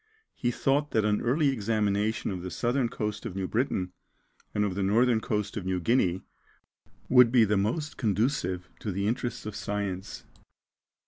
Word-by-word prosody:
He 120 - -1
thought 140 +4 +1
that 110 -1 +2
an 105 0 +1
early 140 +5 +2
examination 105 -3 0
of 90 -2 -4
the 90 - -5
southern 120 +4 0
coast 105 -1 -3
of 90 - -6
New 95 -1 -2
Britain, 105 -6 -1 0.6
and 105 0 +1
of 100 - -1
the 100 - -2
northern 110 +4 +3
coast 105 -2 -2
of 105 - -3
New 95 0 -1
Guinea, 95 -3 +1 0.8
would 125 -2 +6
be 120 -3 +6
the 105 0 +1
most 120 +10 -1
conducive 105 -4 0
to 105 - -3
the 100 +2 -2
interests 120 +2 -2
of 105 -1 -5
science. 100 -2 -4
105 Hz, 170 wpm, -28 LUFS, 100-120 Hz, 0.8 s, would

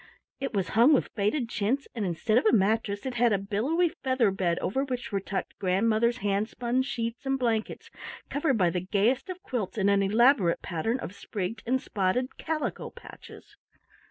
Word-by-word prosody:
It 270 -4 -3
was 190 -3 0
hung 240 +7 +5
with - - -1
faded 230 +5 0
chintz, 235 +6 -1
and 225 - -3
instead 190 +6 +1
of 235 - 0
a - - +5
mattress 205 0 +1
it 260 - -2
had 240 -1 +3
a 200 - +3
billowy 235 - 0
feather 260 - +1
bed 180 -3 0
over 265 +8 -1
which 250 -4 -4
were 200 - 0
tucked 195 0 -5
grandmother's 220 +5 +2
hand 200 +2 +1
spun 245 +1 -1
sheets 235 -2 -3
and 270 0 +1
blankets 230 -4 -2 0.4
covered 285 -3 0
by 180 -4 +3
the 180 - -2
gayest 210 - +1
of 370 +1 -7
quilts 235 - -3
in 200 -1 +2
an 200 0 +3
elaborate 210 -2 +3
pattern 225 +9 -1
of 185 - -6
sprigged 200 +1 -5
and 260 +2 +2
spotted 220 +4 -1
calico 315 -1 -3
patches. - - -14
225 Hz, 185 wpm, -28 LUFS, 200-255 Hz, 0.4 s, hung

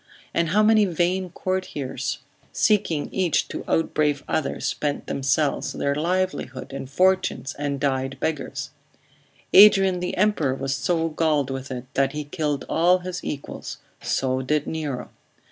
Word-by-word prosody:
and 170 -1 +1
how 210 +5 +4
many 215 0 +5
vain 180 +1 0
courtiers, 145 -8 -3 0.3
seeking 180 -8 +1
each 180 -5 +1
to - - -5
outbrave 150 -3 +1
other, 155 - -1
spent 145 -1 -2
themselves, 140 +2 0
their 140 - 0
livelihood 165 -5 -2
and 135 -1 -6
fortunes, 185 -4 +1
and 145 -1 -2
died 135 -1 -1
beggars? 135 -3 -3 0.8
Adrian 195 -2 +7
the 180 0 -3
Emperor 180 -10 +2
was 135 0 -2
so 165 +4 0
galled 155 -4 +1
with 135 +1 -5
it, 125 -1 -5
that 135 +1 +1
he 150 0 -3
killed 145 -1 -2
all 175 +3 +4
his 180 0 -6
equals; 140 - -6 0.2
so 130 0 0
did 150 +3 0
Nero. 150 -5 -4
150 Hz, 140 wpm, -24 LUFS, 135-180 Hz, 0.8 s, Adrian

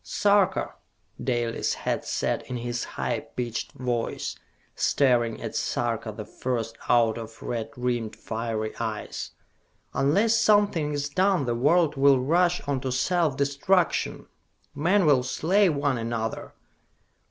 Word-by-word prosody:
"Sarka," 200 -2 +2 0.5
Dalis 120 -3 -1
had - - -2
said - - -1
in 125 - -4
his 120 0 -3
high - - -2
pitched 120 -2 -5
voice, 120 -2 -2 0.4
staring 120 -5 +2
at - - -6
Sarka - - -1
the - - -7
First 115 -3 -3
out 115 -1 +3
of 115 0 -10
red 115 -2 -3
rimmed, 120 -3 -2
fiery 110 -1 -3
eyes, 110 -2 -4 0.6
"unless 195 - +3
something 205 -9 +3
is 145 0 -1
done 185 +1 +2
the 120 - 0
world 150 +5 +3
will 135 -1 +5
rush 175 +6 +2
on 140 -2 -2
to 130 - -2
self 155 +2 +1
destruction! 140 +7 +1 0.5
Men 175 +6 +2
will 145 -4 +5
slay 185 +9 +2
one 140 -4 0
another! 115 -1 -4
135 Hz, 130 wpm, -26 LUFS, 120-170 Hz, 0.6 s, will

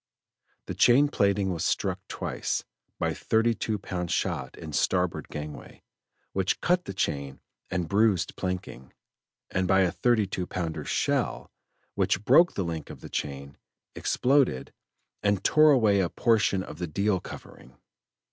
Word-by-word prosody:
The - - -5
chain 140 +4 +5
plating 100 -6 +1
was 80 - -3
struck - - 0
twice, - - -3 0.3
by - - 0
a - - -3
thirty 115 +1 +1
two 110 -1 -2
pound 90 -2 -4
shot - - -2
in 80 -2 -8
starboard 90 +3 0
gangway, 75 0 -8 0.5
which 95 -1 0
cut 180 0 +1
the - - -5
chain 70 -6 -2 0.3
and 90 -3 -2
bruised 100 -2 +2
planking, 90 -9 -5 0.6
and 95 0 0
by 95 +1 +4
a 90 -2 +2
thirty 110 +5 +2
two 90 -2 -4
pounder 85 -3 -4
shell, - - -1 0.4
which 100 +3 0
broke 165 +7 +5
a 100 - +1
link 80 -3 -5
of - - -10
the - - -9
chain, 70 0 -5 0.3
exploded, 130 - +1 0.5
and 100 -2 +1
tore 155 0 +5
away 110 -8 +4
a 90 -3 +1
portion 105 -5 +2
of 75 - -10
the 90 - -2
deal 100 +5 0
covering. 65 -6 -12
95 Hz, 150 wpm, -27 LUFS, 85-110 Hz, 0.6 s, chain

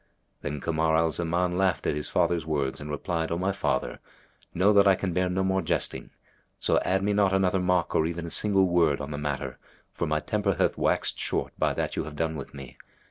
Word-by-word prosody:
Then 75 0 -4
Kamar 80 +2 +1
al 80 0 +2
Zaman 90 +2 -1
laughed 95 -3 +1
at - - +1
his 75 0 -3
father's 85 -2 +1
words 70 -4 -2
and 75 - -7
replied, 80 +2 -2
"O 85 - 0
my 95 +3 0
father, 80 -9 -2 0.5
know 95 +4 +3
that 100 0 +5
I 95 - +6
can 90 -1 -3
bear 90 +1 +1
no 95 +1 0
more 95 0 +1
jesting; 80 - -2 0.5
so - - +2
add 95 +1 0
me 105 +1 +1
not 100 -2 +2
another 95 0 +2
mock 90 -1 +1
or 80 - +2
even 85 0 -4
a 85 - -6
single 95 -3 +3
word 85 -5 +2
on 70 0 -6
the 75 - -4
matter, 75 -2 -4 0.3
for - - -3
my 75 0 +1
temper 100 +2 -1
hath - - +1
waxed - - +1
short - - -2
by - - +1
that - - -2
you - - -2
have 75 - -8
done 80 +1 -1
with 70 - -7
me. 70 -3 -11
85 Hz, 225 wpm, -27 LUFS, 75-95 Hz, 0.5 s, I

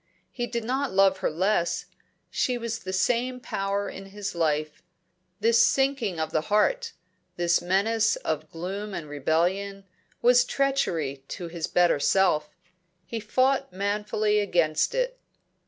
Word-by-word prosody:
He 240 -2 -3
did 235 -1 -3
not 265 +4 -1
love 190 0 +4
her - - 0
less; 180 +2 0 0.5
she 250 -1 0
was 230 -1 -4
the 185 - -6
same 245 +6 0
power 200 -3 -2
in 195 0 -8
his 200 0 -5
life. 155 -2 -1 0.6
This 230 +1 +5
sinking 265 -8 +1
of 160 0 -2
the 155 - +1
heart, 465 - +2 0.4
this 175 0 +2
menace 215 +5 +2
of 155 0 -3
gloom 195 +4 -5
and 155 - -5
rebellion, 175 +7 -1 0.4
was 245 0 +5
treachery 170 - -1
to 175 -2 -6
his 165 -1 -4
better 175 -4 +3
self. 155 -3 +2 0.6
He 230 - -4
fought 260 +5 +1
manfully 210 +2 0
against 170 -6 +1
it. - - -1
200 Hz, 140 wpm, -26 LUFS, 170-235 Hz, 0.6 s, This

